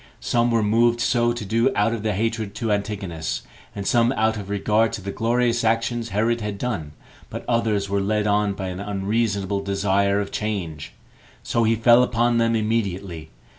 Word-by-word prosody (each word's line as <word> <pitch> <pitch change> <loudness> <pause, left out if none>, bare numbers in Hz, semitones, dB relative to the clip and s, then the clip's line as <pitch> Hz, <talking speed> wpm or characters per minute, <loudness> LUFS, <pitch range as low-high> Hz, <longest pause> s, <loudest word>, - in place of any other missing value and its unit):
Some 120 0 +1
were 115 -2 +2
moved 115 +3 +3
so 120 0 +2
to 120 -3 -5
do 115 +6 +2
out 110 +3 +2
of 115 - -3
their 105 -2 -1
hatred 110 -1 -2
to 115 -2 -2
Antigonus, 100 -6 -3 0.3
and 100 -1 -5
some 120 +2 +3
out 110 -3 +1
of 100 -2 -7
regard 105 +2 +1
to 110 - -4
the 100 - -4
glorious 120 +2 +1
actions 115 +1 0
Herod 115 +3 0
had 105 -1 -4
done; 100 -11 -4 0.4
but - - -7
others 110 -4 +1
were 100 0 0
led 105 +1 0
on 105 -1 +2
by 95 -1 -5
an 90 0 -6
unreasonable 100 0 -1
desire 100 0 +1
of 100 - -4
change; 90 -8 -4 0.5
so 115 -1 +1
he 115 +1 +3
fell 120 +2 +5
upon 120 -1 +2
them 115 0 +2
immediately. 100 -7 -2
110 Hz, 180 wpm, -23 LUFS, 100-115 Hz, 0.5 s, fell